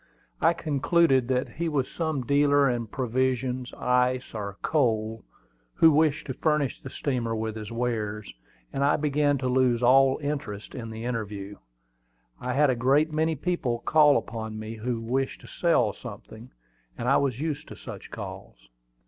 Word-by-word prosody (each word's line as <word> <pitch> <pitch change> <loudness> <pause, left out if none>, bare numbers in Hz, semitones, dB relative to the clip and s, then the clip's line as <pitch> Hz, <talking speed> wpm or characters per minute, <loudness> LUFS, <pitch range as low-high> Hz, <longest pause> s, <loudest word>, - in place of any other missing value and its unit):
I 170 - +5
concluded 145 -3 +2
that 130 0 0
he 170 +1 -3
was 140 -4 0
some 160 -5 -2
dealer 145 +1 +4
in 120 -2 -1
provisions, 130 +1 -1
ice, 125 0 +1
or 100 -2 -5
coal, 110 -6 0 0.5
who 160 - +6
wished 150 0 +2
to 130 - -4
furnish 150 -1 0
the 135 - -8
steamer 125 -5 -2
with 110 0 -3
his 110 0 -7
wares; 110 -3 -3 0.4
and 135 - 0
I 145 - +4
began 145 -1 +1
to 130 -1 -2
lose 125 -2 +2
all 135 +2 +5
interest 140 -8 -4
in 115 -3 -6
the 110 +1 -6
interview. 105 -4 -4 0.8
I 125 0 -3
had 145 +1 +4
a - - 0
great 140 +6 +2
many 160 +1 +1
people 145 -6 -1
call 150 -2 +5
upon 110 -1 -5
me 110 +1 -6
who 115 +1 -2
wished 130 +4 -2
to - - -13
sell 125 - +2
something, 110 +1 -10 0.5
and - - -3
I - - +5
was 130 -4 0
used 150 -1 -3
to - - -9
such - - -9
calls. - - -9
130 Hz, 165 wpm, -26 LUFS, 115-145 Hz, 0.8 s, who